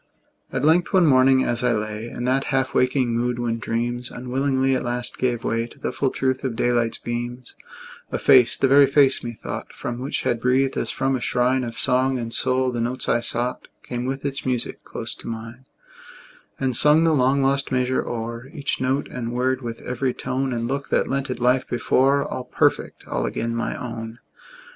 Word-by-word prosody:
At - - -1
length, 170 +5 +3
one 185 -3 +5
morning, 130 -2 +5
as 120 +1 -1
I 125 -1 +3
lay 110 +1 -3
In 120 - -6
that 130 +2 +1
half 135 -1 0
waking 125 -2 +2
mood 120 +1 0
when 115 -1 -2
dreams 120 +2 -2
Unwillingly 130 +1 0
at - - -1
last 120 0 -3
gave 120 -2 0
way 115 0 -1
To - - -17
the - - -3
full 135 - 0
truth 130 0 -1
of 130 -4 -2
daylight's 120 -1 +1
beams, 120 +1 -5 0.6
A - - -1
face 130 -4 +5
the 135 - +3
very 140 +1 +6
face, 135 -1 +3
methought, 120 -2 -6
From 120 0 -5
which 135 +3 -3
had 120 - 0
breathed, 130 +2 +2
as - - -2
from 135 0 0
a 125 - -3
shrine 125 +2 +1
Of 115 -1 -6
song 130 +1 +2
and 115 -1 -4
soul, 130 0 +2
the 120 -1 -2
notes 125 +2 -2
I 120 - +3
sought 120 +1 -2 0.2
Came 120 0 -4
with 135 +2 -3
its 140 0 -3
music 125 -2 -2
close - - -5
to - - -10
mine; 115 +3 -7 0.9
And 130 -2 0
sung 150 +6 +4
the 165 -1 +3
long 135 0 +3
lost 140 +1 +1
measure 130 0 +1
o'er, 115 +1 -5
Each 145 -5 -3
note 135 +2 0
and 120 -2 -5
word, 130 +2 0
with 115 -2 -6
every 125 +1 -2
tone 130 +1 -2
And 115 -1 -2
look, 140 +2 -3
that - - +1
lent 140 0 -1
it 125 - -3
life 125 +1 +2
before, 135 +3 +2
All 125 - -5
perfect, - - 0
all - - -1
again 115 0 -2
my 115 - -2
own! 115 -2 -6
125 Hz, 200 wpm, -23 LUFS, 120-135 Hz, 0.9 s, very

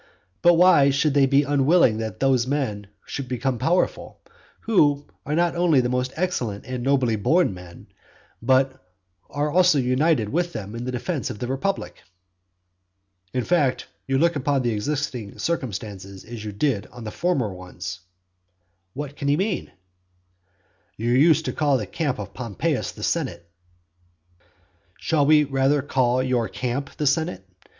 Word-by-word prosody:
But 175 0 +6
why 165 -5 +6
should 140 +1 +1
they 140 -1 +4
be 140 +2 +4
unwilling 140 -4 +3
that 110 -4 -5
those 130 -2 +2
men 110 -8 -2 0.2
should 140 -2 -5
become 125 0 -2
powerful, 175 +8 0 0.4
who 145 -10 +2 0.2
are 150 - 0
not 175 +1 +1
only 170 -5 +3
most 125 +1 -1
excellent 125 - -2
and 125 -1 -4
nobly 130 -4 +2
born 155 - +2
men, 90 -1 -12 0.6
but 130 +2 +3 0.5
who - - -28
are 145 +1 0
also 180 -2 +4
united 130 -2 +2
with 175 +5 -1
them 105 -2 -6
in 120 +1 -5
the 125 - -3
defence 135 +4 -3
of 120 - -6
the 125 - -4
republic? 135 +10 -3 1.3
"In 125 - -1
fact, 145 -6 +1 0.2
you 135 0 +1
look 170 +3 +2
upon 140 -1 0
the 120 - +1
existing 120 -1 -3
circumstances 100 - -4
as 115 -2 -8
you 105 - -5
did 105 0 -1
on 120 -1 -11
the 110 - -5
former 135 - -1
ones." 90 -1 -8 1.0
What 145 0 -5
can 140 - -4
he 145 +1 +3
mean? 195 0 -2 1.3
"You 115 +2 -1
used 155 +5 +4
to - - -2
call 145 -3 +2
the 105 - -4
camp 145 - -2
of 100 -1 -7
Pompeius 115 - -2
the - - -10
senate." 85 - -2 0.9
XII. 90 - -34 0.5
Should 155 - +1
we 150 +1 +6
rather 135 0 +1
call 130 -2 +1
your 125 -3 0
camp 130 +6 -4
the 150 - -1
senate? 135 - 0
135 Hz, 160 wpm, -23 LUFS, 115-150 Hz, 1.3 s, But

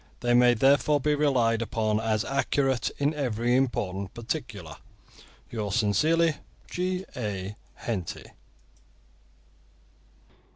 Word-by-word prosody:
They 120 0 +2
may 120 0 +6
therefore 140 +4 +4
be 150 +2 +1
relied 125 -6 +2
upon 110 -2 0
as 110 -1 0
accurate 135 -2 +1
in 145 +2 +1
every 120 -4 0
important 100 -7 -1
particular. 120 - -5 0.7
Yours 105 -3 -2
sincerely, 155 - +2 0.3
G. 185 +1 -2
A. 105 -4 -4 0.2
HENTY. 95 -8 -5
120 Hz, 95 wpm, -27 LUFS, 105-140 Hz, 0.7 s, may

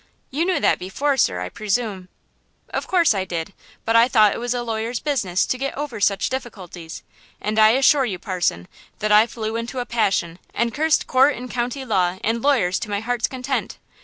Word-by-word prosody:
"You 305 +6 0
knew 365 -4 +1
that - - +2
before, 275 +10 -1
sir, 90 - +1
I 90 - -4
presume." 205 - -3 0.6
"Of - - -3
course 345 -8 +3
I 195 -2 -1
did; 175 0 -5 0.3
but 225 - +1
I 230 +1 +6
thought 215 -5 +4
it - - -5
was 245 +1 -2
a 240 - -2
lawyer's 230 +1 -3
business 220 -12 0
to 255 - -2
get 275 0 -3
over 275 -7 -5
such 200 -1 +2
difficulties; 185 -10 -7 0.4
and 215 +1 -1
I 215 0 +7
assure 270 +1 +4
you, 200 -6 -3
parson, 175 - -2 0.3
that 215 0 -1
I 210 +2 +6
flew 220 -1 -4
into 230 +3 -4
a 245 - -2
passion 195 -7 0 0.2
and 235 0 0
cursed 315 +1 +2
court 265 +3 +4
and 250 +1 -8
county 250 +2 -3
law 185 -5 +1
and 225 +2 0
lawyers 235 -11 +2
to 215 - -6
my 200 0 -1
heart's 235 +1 -1
content. 260 +1 -3
230 Hz, 200 wpm, -22 LUFS, 195-255 Hz, 0.6 s, I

